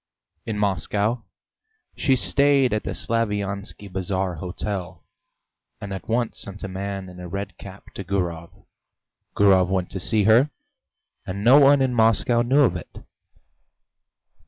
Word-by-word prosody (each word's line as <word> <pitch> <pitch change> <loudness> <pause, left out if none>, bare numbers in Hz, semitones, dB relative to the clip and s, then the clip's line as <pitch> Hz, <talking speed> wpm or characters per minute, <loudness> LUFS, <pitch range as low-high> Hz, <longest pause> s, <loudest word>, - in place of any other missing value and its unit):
In 110 -2 -3
Moscow 105 +3 0 0.7
she 135 -3 +2
stayed 140 -1 +3
at 105 - -1
the - - -3
Slaviansky 105 -3 -2
Bazaar 95 0 -2
hotel, 90 +2 -5 0.8
and 100 -1 -6
at 95 +2 -8
once 120 0 -1
sent 100 +1 -6
a - - -3
man 95 0 -5
in 90 0 -12
a 90 - -7
red 100 0 -5
cap 100 0 -12
to 100 - -6
Gurov. 85 -3 -3 0.9
Gurov 95 -3 +4
went 95 -2 -1
to 95 - -5
see 105 +3 +1
her, 115 +8 +5 0.8
and 100 +2 -4
no 130 +5 +7
one 140 -1 +5
in 130 -1 0
Moscow 115 +1 +3
knew 130 +5 +3
of 135 - +3
it. - - -9
100 Hz, 140 wpm, -23 LUFS, 95-115 Hz, 0.9 s, no